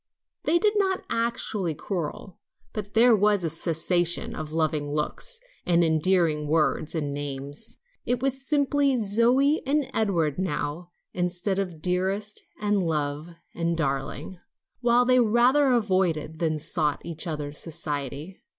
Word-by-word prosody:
They 335 - +4
did 420 +2 +2
not 380 -2 0
actually 225 -7 -1
quarrel, 175 +2 -5 0.3
but 205 -1 -6
there 235 +1 +6
was 205 -2 +2
a 165 - 0
cessation 175 +6 0
of 155 -1 -6
loving 155 -2 0
looks 155 - -2 0.2
and 170 -1 +3
endearing 160 -1 +2
words 155 +1 +1
and 145 -3 -2
names. 145 +6 -6 0.3
It 245 - 0
was 270 0 -1
simply 285 -2 +2
Zoe 240 +8 +3
and 285 0 +1
Edward 175 -9 0
now 165 -1 -3 0.2
instead 180 +2 -1
of 175 -5 -4
dearest 190 +4 0 0.2
and 205 -1 +1
love 150 -2 -2 0.3
and 170 0 -1
darling, 140 +4 -3 0.4
while 245 0 +3
they 255 0 +4
rather 245 +5 +4
avoided 185 - +1
than 160 -2 0
sought 155 -1 -1
each 165 0 -4
other's 150 -2 -3
society. 150 +1 -4
180 Hz, 130 wpm, -26 LUFS, 155-230 Hz, 0.4 s, there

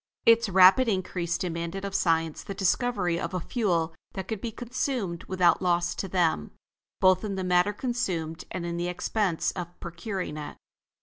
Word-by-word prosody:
Its 230 -1 +5
rapid 190 +7 +7
increase 180 -4 -1
demanded 170 +2 -3
of 200 - -5
Science 165 -4 +1
the 195 - -7
discovery 190 -3 +1
of 185 - -4
a - - 0
fuel 170 -5 0 0.2
that 190 -1 -5
could 220 -3 -4
be 235 - -3
consumed 235 -6 -3
without 185 -2 +3
loss 175 -1 +1
to 195 - -4
them, 170 - +1 0.5
both 185 +1 +4
in 205 -2 -3
the 190 - -2
matter 180 +2 +3
consumed 185 -9 -3
and 175 -2 -4
in 170 0 -3
the 175 +1 -1
expense 180 0 0
of 175 -1 -7
procuring 175 -1 -5
it. 150 -1 -7
185 Hz, 170 wpm, -27 LUFS, 170-200 Hz, 0.5 s, rapid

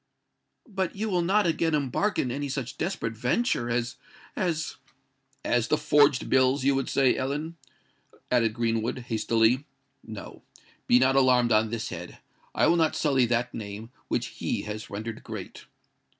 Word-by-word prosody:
"But 190 -5 -3
you 215 +2 -2
will 180 -3 +1
not 195 +4 +2
again 165 -1 +1
embark 150 - 0
in 125 - 0
any 145 +2 -3
such 130 -2 -5
desperate 115 - -2
venture 125 - 0
as—as——" 145 +7 -3 0.7
"As 120 -1 +1
the 155 - +2
forged 145 -3 +3
bills, 130 +1 +3
you 140 +1 +3
would 135 -1 -1
say, 135 -2 +3
Ellen," 145 +5 -3 0.8
added 115 -3 +2
Greenwood, 115 0 -1
hastily. 115 +3 +2 0.4
"No:—be 120 - -3
not 130 +1 +3
alarmed 125 -3 +4
on 110 0 +3
this 115 -1 -3
head. - - -8 0.4
I - - +3
will 170 - +4
not 160 -1 +2
sully 135 -5 +2
that 120 +1 0
name 105 +2 -7 0.2
which - - -1 0.2
he - - -1
has 105 0 -6
rendered 110 +2 -6
great." - - -8
130 Hz, 150 wpm, -27 LUFS, 115-150 Hz, 0.8 s, alarmed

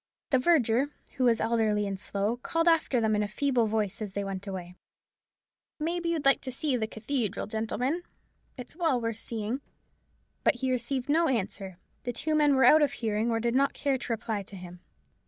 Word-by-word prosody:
The 260 - +5
verger, 260 -3 +3 0.3
who 255 - +2
was 230 -2 +4
elderly 220 -2 +1
and 195 -1 -3
slow, 200 +5 -1
called 330 +7 -1
after 325 -6 +3
them 220 -1 +2
in 210 - +1
a 210 - 0
feeble 245 +1 +1
voice 215 -2 -1
as 205 -3 -4
they 200 - -2
went 195 0 -5
away: 180 -2 -6 1.0
"Maybe 335 +2 -1
you'd 320 -4 -1
like 275 - +5
to 260 - -5
see 270 +1 0
the 220 -3 -1
cathedral, 220 -1 -2
gentlemen; 245 +9 -2 0.6
it's 250 +3 -8
well 320 -7 +1
worth 230 -1 -3
seeing." 225 +4 -4 0.8
But - - +4
he 260 -1 -1
received 255 +1 -1
no 325 +3 +3
answer. 195 - -2 0.2
The 245 - -4
two 310 +6 -1
men 295 -2 +4
were 265 -2 +5
out 310 +5 +7
of 285 -2 +2
hearing, 220 -2 -1
or 225 -1 +1
did 235 +1 0
not 275 +2 +3
care 275 -2 0
to 245 - -5
reply 225 -2 -2
to 200 +1 -10
him. 180 -1 -10
235 Hz, 195 wpm, -28 LUFS, 215-275 Hz, 1.0 s, out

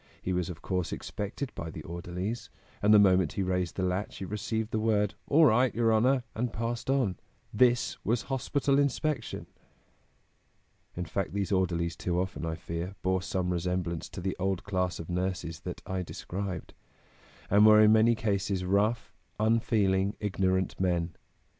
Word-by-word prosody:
He 95 - -2
was 90 -1 -1
of 85 -2 -8
course 90 -3 -1
expected 105 +7 -5
by 85 - -5
the 75 -1 -8
orderlies, 90 +6 -5 0.3
and 105 - +4
the 105 - +9
moment 95 -5 +4
he 100 - -1
raised 90 -1 -1
the 95 - -1
latch 90 +3 -2
he 95 - -5
received 105 +3 -3
the 110 - 0
word: 105 -2 +1
'All 155 +3 +6
right, 125 0 +4
your 115 -1 +3
honor!' 125 +4 +3
and 120 +1 -2
passed 115 +2 -3
on. 130 -10 +1 0.4
This 120 +2 +2
was 115 +1 0
hospital 140 +1 0
inspection!" 140 -2 -1 1.5
In 90 - -3
fact, 95 +1 -3
these 100 0 -2
orderlies 85 -3 0
too 90 -1 -1
often, 90 -2 -3
I 80 - -2
fear, 85 +3 -5
bore 95 0 +1
some 90 -2 -1
resemblance 90 -1 -2
to 95 - -7
the 95 +1 -2
old 95 -1 -1
class 90 -3 -1
of 80 - -6
nurses 90 -2 -2
that - - -7
I 95 -1 -2
described, 90 0 -5 0.8
and 100 +2 +6
were 110 0 +8
in 105 0 +7
many 110 +2 +5
cases 100 -3 -1
rough, 100 +3 +1 0.3
unfeeling, 105 -3 +2
ignorant 95 -2 0
men. 85 -3 0
95 Hz, 165 wpm, -29 LUFS, 90-110 Hz, 1.5 s, the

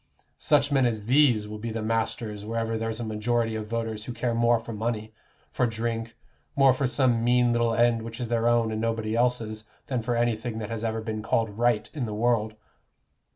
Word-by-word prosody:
Such 145 -1 +2
men 135 -3 +4
as 110 -3 -3
these 125 -4 +4
will 105 0 -7
be 115 +2 -4
the 110 0 -3
masters 110 -1 -2
wherever 115 +1 -2
there's 115 0 -2
a - - -3
majority 115 +1 -1
of 110 -1 -4
voters 115 -1 -3
who 125 - -5
care 120 0 -1
more 120 0 +3
for 115 0 -8
money, 110 0 -3 0.4
for 125 - +1
drink, 115 0 -3 0.4
more 135 -2 +6
for 135 +1 0
some 125 -3 +2
mean 120 0 +3
little 120 -1 +1
end 120 -1 +3
which 115 +2 -7
is 120 - -2
their 115 0 +1
own 120 -2 +3
and 110 0 -2
nobody 115 -1 -1
else's, 115 -3 0 0.2
than 125 -3 -2
for 120 +1 -1
anything 120 -1 -1
that 110 0 -5
has 115 -1 -4
ever 110 -1 -1
been 110 -1 -4
called 110 0 0
Right 120 -1 +1
in 135 -7 -3
the 105 - -4
world. 110 -1 +1
115 Hz, 205 wpm, -26 LUFS, 110-120 Hz, 0.4 s, more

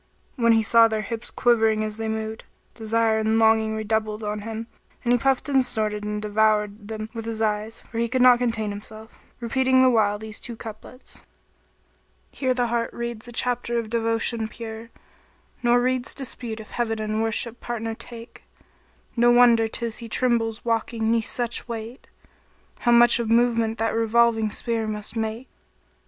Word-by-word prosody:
When 230 -4 +4
he 225 0 +3
saw 230 +1 +6
their 220 -1 -2
hips 230 +2 -5
quivering 220 -3 +2
as 215 0 -4
they 225 0 -3
moved, 220 0 -4 0.3
desire 225 0 +1
and 220 +1 +1
longing 220 -1 +3
redoubled 215 0 -2
on 210 0 -3
him; 225 +1 -6 0.4
and 240 0 +2
he 245 - +3
puffed 270 +2 +1
and 270 -2 +3
snorted 215 -4 -2
and 210 0 -3
he 210 0 -4
devoured 210 -1 +1
them 215 0 -5
with 225 -1 -6
his 225 -1 -4
eyes, 215 0 -2
for 230 - -7
he 235 - +1
could 250 +1 +1
not 250 -1 +7
contain 225 -4 -1
himself, 215 +2 -10 0.3
repeating 260 +2 +2
the 255 - +5
while 210 -3 +2
these 215 0 -7
two 235 - -7
couplets, 225 +3 -10 1.1
"Here 260 -2 -1
the 245 -1 +1
heart 235 0 -1
reads 235 -1 -5
a - - -8
chapter 240 0 -1
of 225 -2 -3
devotion 230 0 0
pure; 225 0 -8 0.4
* - - -36
Nor 240 0 +4
reads 255 0 -1
dispute 240 -4 -5
if 215 - -11
Heaven 225 -2 -2
in 215 0 -1
worship 225 +1 -1
partner 225 -1 -4
take: 230 +1 -11 0.7
No 240 0 +4
wonder 240 -2 +5
'tis 230 0 -2
he 230 -1 -8
trembles 230 -1 0
walking 225 -1 0
'neath 230 -1 +1
such 240 -1 -3
weight! 230 +2 -7 0.4
* - - -34
How 240 - +2
much 240 0 +6
of 230 -2 -2
movement 230 -1 +2
that 225 +1 0
revolving 225 -1 +2
sphere 225 +1 -2
must 210 +1 -5
make. 225 +3 -3
225 Hz, 175 wpm, -24 LUFS, 220-235 Hz, 1.1 s, not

